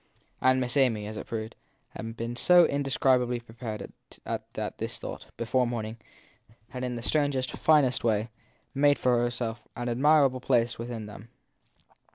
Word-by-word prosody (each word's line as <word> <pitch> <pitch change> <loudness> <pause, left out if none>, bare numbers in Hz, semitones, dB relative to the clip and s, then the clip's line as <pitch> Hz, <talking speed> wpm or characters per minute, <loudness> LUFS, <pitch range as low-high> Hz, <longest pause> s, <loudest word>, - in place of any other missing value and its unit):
And 130 0 +4
Miss 125 +2 0
Amy, 115 -6 +2
as 110 +1 -6
it - - -7
proved, 110 0 -5 0.3
had 115 +1 -7
been 115 +1 -4
so 175 +6 +6
indescrib 135 -2 +2
ably 125 0 -2
prepared 115 -2 -7 0.3
that - - -5
this - - -4
thought, - - -7
before 120 +2 +1
morning, 115 -1 -4 0.7
had, 125 0 -6
in 125 -1 -2
the 120 - -6
strangest, 140 -4 0
finest 145 -5 +3
way, 110 0 +1 0.4
made 145 +1 +4
for 120 -1 +2
itself 120 -1 -4
an 120 0 -3
admirable 135 +1 +4
place 120 -2 +1
with 115 - -4
them. 110 -2 -8
120 Hz, 155 wpm, -28 LUFS, 115-130 Hz, 0.7 s, so